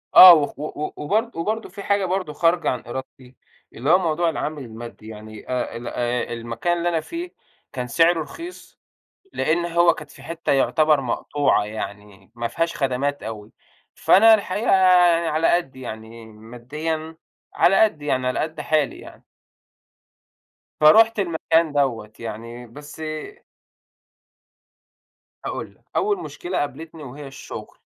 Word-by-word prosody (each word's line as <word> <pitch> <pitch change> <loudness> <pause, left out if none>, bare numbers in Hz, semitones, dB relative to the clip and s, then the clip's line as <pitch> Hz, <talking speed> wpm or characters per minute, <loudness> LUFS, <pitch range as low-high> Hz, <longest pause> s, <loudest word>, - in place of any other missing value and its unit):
آه 185 -1 +12
وخ 145 -3 0
و - - -4
و 150 0 -5
وبرض 220 +10 -1
وبرضه 215 +7 -3
في 200 - -9
حاجة 200 -1 +1
برضه 185 -4 -2
خارجة 170 +2 +2
عن 125 - -3
إرادتي، 130 0 -8 0.4
اللي 130 +6 -3
هو 180 - +7
موضوع 170 -1 +1
العامل 150 -2 -4
المادي 115 -1 -10
يعني 110 0 -11
آآ، 125 -2 -2
ال 120 - -8
آآ 120 0 -2
المكان 120 +9 -2
اللي 175 +1 0
أنا 165 -2 0
فيه 345 - -6 0.4
كان 125 -2 -4
سعره 165 +6 +3
رخيص، 340 - -10 0.5
لإن 170 +2 0
هو 170 0 +4
كانت - - -11
في - - -15
حتّة 165 -2 -2
يعتبر 150 +2 +3
مقطوعة 135 0 0
يعني، 105 -2 -8
ما 120 0 -3
فيهاش 165 +4 -2
خدمات 140 +1 -1
أوي، 110 0 -7 0.4
فأنا 220 +3 +6
الحقيقة 205 +1 -2 0.5
أنا 170 -1 -2
على 155 +2 +2
قدّي، 135 -7 -2
يعني 110 -1 -9
ماديًا 145 +9 -6 0.4
على 195 +2 +4
قدّي 150 -8 -3
يعني 130 -2 0
على 125 - 0
قد 155 0 -4
حالي 150 -2 0
يعني - - -13 1.6
فرُحت 220 +9 +6
المكان 165 -3 +1
دوّة 125 -7 -1
يعني 115 +2 -7
بس 145 +6 -12 2.4
هاقول - - -5
لك، - - -33
أول 405 -2 +1
مشكلة 355 - -5
قابلتني 155 +3 -5
وهي 140 +2 -9
الشغل، 135 - -10
150 Hz, 140 wpm, -22 LUFS, 120-170 Hz, 2.4 s, آه